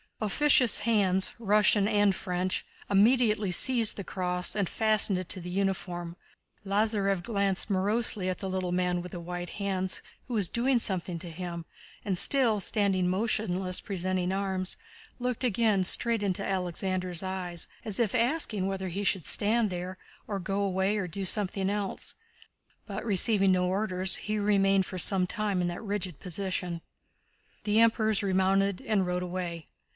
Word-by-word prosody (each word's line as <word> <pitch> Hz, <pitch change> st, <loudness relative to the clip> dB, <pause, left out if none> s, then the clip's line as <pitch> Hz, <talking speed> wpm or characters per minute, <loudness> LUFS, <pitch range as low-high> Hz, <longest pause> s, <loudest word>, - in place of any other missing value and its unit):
Officious 245 Hz, +2 st, +4 dB
hands, 200 Hz, -4 st, +2 dB
Russian 210 Hz, -1 st, +3 dB
and 205 Hz, -2 st, +3 dB
French, 180 Hz, 0 st, -2 dB, 0.3 s
immediately 215 Hz, -1 st, +3 dB
seized 230 Hz, +3 st, +2 dB
the 200 Hz, -, -4 dB
cross 180 Hz, -1 st, 0 dB
and 200 Hz, -4 st, 0 dB
fastened 215 Hz, -3 st, +3 dB
it 185 Hz, -1 st, -5 dB
to 190 Hz, -, -3 dB
the 180 Hz, 0 st, -7 dB
uniform. 180 Hz, -2 st, -2 dB, 0.5 s
Lázarev 200 Hz, -2 st, +1 dB
glanced 200 Hz, -2 st, 0 dB
morosely 200 Hz, 0 st, +1 dB
at 185 Hz, -, -2 dB
the 190 Hz, -, -5 dB
little 185 Hz, -1 st, -2 dB
man 180 Hz, 0 st, 0 dB
with 180 Hz, 0 st, -8 dB
white 175 Hz, 0 st, -6 dB
hands 190 Hz, -2 st, -1 dB, 0.3 s
who 245 Hz, -, -3 dB
was 200 Hz, -6 st, +2 dB
doing 245 Hz, +1 st, +2 dB
something 185 Hz, -5 st, -1 dB
to 175 Hz, +1 st, -7 dB
him 170 Hz, 0 st, -6 dB, 0.4 s
and, 190 Hz, -3 st, -1 dB
still 245 Hz, -7 st, +3 dB
standing 195 Hz, -2 st, +1 dB
motionless 185 Hz, -2 st, 0 dB
presenting 185 Hz, -1 st, -2 dB
arms, 190 Hz, -1 st, -1 dB, 0.4 s
looked 250 Hz, 0 st, -2 dB
again 220 Hz, -4 st, +2 dB
straight 230 Hz, +4 st, +2 dB
into 195 Hz, -1 st, -1 dB
Alexander's 185 Hz, -1 st, -2 dB
eyes, 180 Hz, -3 st, -4 dB, 0.2 s
as 215 Hz, -2 st, -4 dB
if 225 Hz, -5 st, +1 dB
asking 235 Hz, -5 st, +1 dB
whether 190 Hz, -1 st, -3 dB
he 195 Hz, +4 st, -3 dB
should 190 Hz, -4 st, 0 dB
stand 215 Hz, 0 st, +2 dB
there, 180 Hz, +1 st, -5 dB, 0.3 s
or 200 Hz, -, -2 dB
go 195 Hz, +2 st, -2 dB
away, 195 Hz, +1 st, 0 dB
or 190 Hz, -3 st, -2 dB
do 190 Hz, +3 st, -4 dB
something 195 Hz, 0 st, 0 dB
else. 205 Hz, -1 st, -3 dB, 0.7 s
But 200 Hz, 0 st, -5 dB
receiving 200 Hz, -1 st, +3 dB
no 180 Hz, -1 st, +2 dB
orders, 185 Hz, -1 st, +1 dB
he 215 Hz, +1 st, -3 dB
remained 195 Hz, -2 st, +3 dB
for 185 Hz, -, -6 dB
some 185 Hz, +1 st, +2 dB
time 205 Hz, -1 st, -1 dB
in 175 Hz, -, 0 dB
that 175 Hz, -, -6 dB
rigid 200 Hz, -6 st, -4 dB
position. 180 Hz, -2 st, -3 dB, 0.8 s
The 210 Hz, +1 st, +3 dB
Emperors 220 Hz, -2 st, +3 dB
remounted 195 Hz, 0 st, +1 dB
and 210 Hz, -4 st, 0 dB
rode 180 Hz, 0 st, -2 dB
away. 175 Hz, -3 st, -5 dB
195 Hz, 155 wpm, -29 LUFS, 180-210 Hz, 0.8 s, Officious